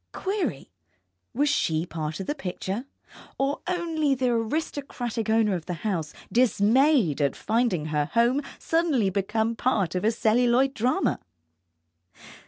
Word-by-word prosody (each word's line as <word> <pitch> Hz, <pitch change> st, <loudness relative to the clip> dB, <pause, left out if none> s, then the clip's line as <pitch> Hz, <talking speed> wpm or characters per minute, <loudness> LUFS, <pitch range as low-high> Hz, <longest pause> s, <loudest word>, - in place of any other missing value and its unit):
Query, 365 Hz, -, -3 dB, 0.6 s
was 285 Hz, +5 st, +1 dB
she 165 Hz, -, +1 dB
part 155 Hz, -1 st, -5 dB
of 190 Hz, -, -4 dB
the -, -, -1 dB
picture, 195 Hz, -1 st, -4 dB, 0.5 s
or 275 Hz, +2 st, -1 dB
only 325 Hz, -5 st, 0 dB
the 255 Hz, -1 st, 0 dB
aristocratic 240 Hz, -1 st, -2 dB
owner 220 Hz, -2 st, +3 dB
of 175 Hz, -3 st, -4 dB
the 180 Hz, -, -2 dB
house, 165 Hz, -8 st, -1 dB, 0.2 s
dismayed 240 Hz, -, +3 dB
at 140 Hz, -2 st, +1 dB
finding 220 Hz, -8 st, 0 dB
her 150 Hz, -1 st, 0 dB
home 240 Hz, +4 st, +3 dB, 0.2 s
suddenly 305 Hz, -, +1 dB
become 220 Hz, +4 st, 0 dB
part 220 Hz, -8 st, 0 dB
of 180 Hz, -, -2 dB
a 215 Hz, -, +4 dB
celluloid 245 Hz, +4 st, +2 dB
drama? 245 Hz, +1 st, 0 dB
230 Hz, 130 wpm, -26 LUFS, 190-270 Hz, 0.6 s, a